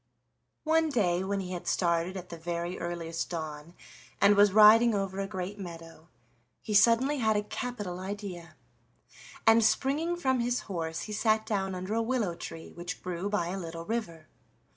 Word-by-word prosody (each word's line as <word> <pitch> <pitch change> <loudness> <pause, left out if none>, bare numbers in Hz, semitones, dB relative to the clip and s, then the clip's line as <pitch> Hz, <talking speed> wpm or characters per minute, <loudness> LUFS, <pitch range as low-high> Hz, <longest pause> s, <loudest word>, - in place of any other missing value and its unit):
One 320 0 +2
day 185 -9 +1
when 195 +1 -1
he 185 -1 -6
had 175 -1 -6
started 170 +1 0
at 180 -1 -8
the 170 - -7
very 170 +1 -4
earliest 170 -1 -4
dawn, 155 0 -6 0.4
and 200 +1 +6
was 205 0 +6
riding 220 +2 +7
over 195 -1 -2
a 195 - -2
great 190 +1 -5
meadow, 165 -3 -10 0.6
he 215 - -4
suddenly 240 +7 +4
had 220 -2 +2
a 210 - 0
capital 205 -6 -5
idea, 190 -3 -7 0.9
and, 225 0 +6
springing 280 +10 +1
from 260 -7 0
his 240 +1 0
horse, 165 -4 -4
he 215 - -6
sat 220 0 +2
down 195 -3 -1
under 185 +3 -4
a 230 - +1
willow 225 -6 0
tree 165 -1 -8
which 175 +1 -7
grew 180 +2 -3
by 175 -5 -1
a 190 +2 -3
little 165 -1 -7
river. 170 -8 -4
195 Hz, 170 wpm, -29 LUFS, 175-220 Hz, 0.9 s, riding